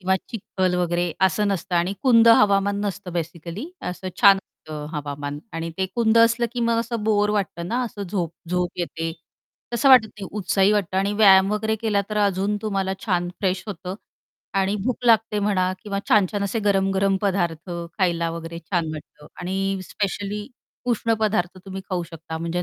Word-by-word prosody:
किंवा 190 +1 +2
चिखल 190 -4 -1
वगैरे 175 -1 0
असं 210 +4 0
नसतं. 185 -2 -2
आणि 175 +3 +1
कुंद 230 -3 +6
हवामान 200 -2 +4
नसतं 195 -2 -4
बेसिकली 170 - -5 0.2
असं 185 +1 -6
छान 200 -1 +8
असंत 195 -4 -13 0.2
हवामान 145 0 -4
आणि 165 0 -4
ते 190 - +1
कुंद 230 -1 +3
असलं, 230 +1 +4
की 245 - -3
मग 230 0 +2
असं 230 -1 -4
बोर 210 -1 +2
वाटतं 195 -5 -2
ना 240 +5 0
असं 210 -3 -6
झोप 175 -4 -2 0.2
झोप 180 0 0
येते. 165 -1 -3 0.6
तसं 235 +4 +3
वाटत 250 -4 +8
नाही 200 -3 -9
उत्साही 195 +1 +3
वाटतं 195 -3 0
आणि 195 +2 +1
व्यायाम 195 -2 +6
वगैरे 220 +1 0
केला, 215 -2 0
तर 210 - -2
अजून 200 0 +1
तुम्हाला 195 -3 -1
छान 175 -3 +1
फ्रेश 185 -2 0
होतं 185 -2 -5 0.6
आणि 195 +1 +1
भूक 250 -1 -2
लागते 225 -2 +4
म्हणा 190 -3 +1
किंवा 200 -2 -3
छान-छान 205 -1 +3
असे 200 +3 -1
गरम, 195 -1 +3
गरम 195 0 +2
पदार्थ 175 -3 -1 0.3
खायला 170 -3 +1
वगैरे 165 0 -6
छान 170 0 -2
वाटतं. 150 -1 -11
आणि 195 +2 -1
स्पेशली 205 +1 -3 0.4
उष्ण 230 0 +1
पदार्थ 190 -4 0
तुम्ही 195 0 -6
खाऊ 180 -1 0
शकता 165 -1 -8
म्हणजे 170 +2 -2
195 Hz, 170 wpm, -23 LUFS, 175-210 Hz, 0.6 s, छान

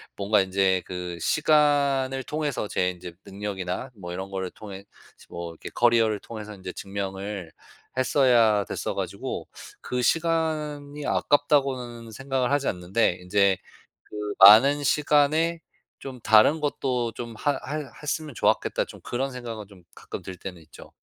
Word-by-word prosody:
뭔가 100 +1 +2
인제 95 -1 +1
그 90 -1 -5
시간을 140 - +2
통해서 150 -6 -2
제 90 0 +1
인제 90 -1 -10
능력이나 100 +3 -5
뭐 90 - -5
이런 95 +2 -6
거를 95 -1 -3
통해 100 -2 -10 0.3
스 - - -19
뭐 85 -1 -6
이렇게 80 - -9
커리어를 115 -3 +3
통해서 105 -2 -8
이제 95 -1 -7
증명을 95 -2 -5 0.5
했어야 120 -6 +4
됐어 - - -4
가지고 - - -4 0.3
'그 125 0 -2
시간이 150 -2 -1
아깝다.'고는 130 -5 +1
생각을 135 +1 -1
하지 145 -1 +1
않는데 90 +1 0
이제 100 +1 +3 0.5
'그 105 -1 -5
많은 135 +8 +8
시간에 150 +4 +2 0.4
좀 130 -2 -9
다른 110 +9 +5
것도 125 -5 -1
좀 115 -1 -7
하 145 - +1 0.2
해 150 -3 -5
했으면 150 -2 -3
좋았겠다.' - - +1
좀 - - -13
그런 135 +3 -3
생각은 115 -4 -7
좀 95 -3 -17
가끔 - - -7
들 95 -1 -8
때는 90 -2 -8
있죠. 80 - -15
115 Hz, 295 characters per minute, -25 LUFS, 95-140 Hz, 0.5 s, 많은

